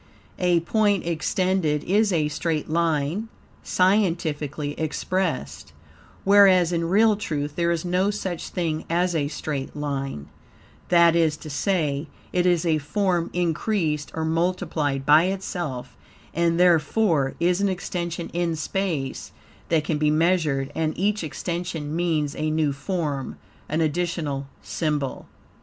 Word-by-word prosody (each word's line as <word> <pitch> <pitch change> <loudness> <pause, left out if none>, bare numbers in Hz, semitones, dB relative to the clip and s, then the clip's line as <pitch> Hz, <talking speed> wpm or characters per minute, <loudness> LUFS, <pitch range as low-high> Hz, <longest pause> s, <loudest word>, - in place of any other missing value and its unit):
A 175 -2 +3
point 205 +1 +1
extended 170 -2 0
is 205 +3 +2
a 155 -4 +2
straight 155 +1 -2
line, 165 +4 0 0.3
scientifically 165 -7 +1
expressed 160 - -2 0.5
(whereas 190 -3 +6
in 170 0 0
real 215 +3 +5
truth 150 -7 -3
there 170 -1 +1
is 170 0 -1
no 180 +3 +1
such 190 -5 -4
thing 160 -3 -2
as 175 +2 +1
a 150 -3 0
straight 145 -2 -4
line); 135 - -3 0.6
that 170 -1 +5
is 160 -2 +2
to 155 - -9
say, 150 -2 0 0.3
it 180 0 +2
is 175 -1 +2
a 160 -2 +2
form 175 +2 0
increased 170 -3 -1
or 160 0 -1
multiplied 160 -4 -1
by 155 +3 +6
itself, 180 -8 -4 0.4
and 170 0 +1
therefore, 165 -3 +3
is 180 +2 +2
an 200 - +2
extension 175 -2 -3
in 170 -1 -1
space 155 -5 -3 0.4
that 160 -2 +2
can 150 -1 -1
be 150 0 +3
measured, 155 -4 +1
and 155 -1 -1
each 205 +1 0
extension 165 -1 -4
means 160 -4 0
a 155 0 -1
new 155 -2 +1
form, 145 -2 -3 0.3
an 155 +2 0
additional 155 -3 -1 0.2
symbol. 150 -4 -2
165 Hz, 130 wpm, -24 LUFS, 150-180 Hz, 0.6 s, whereas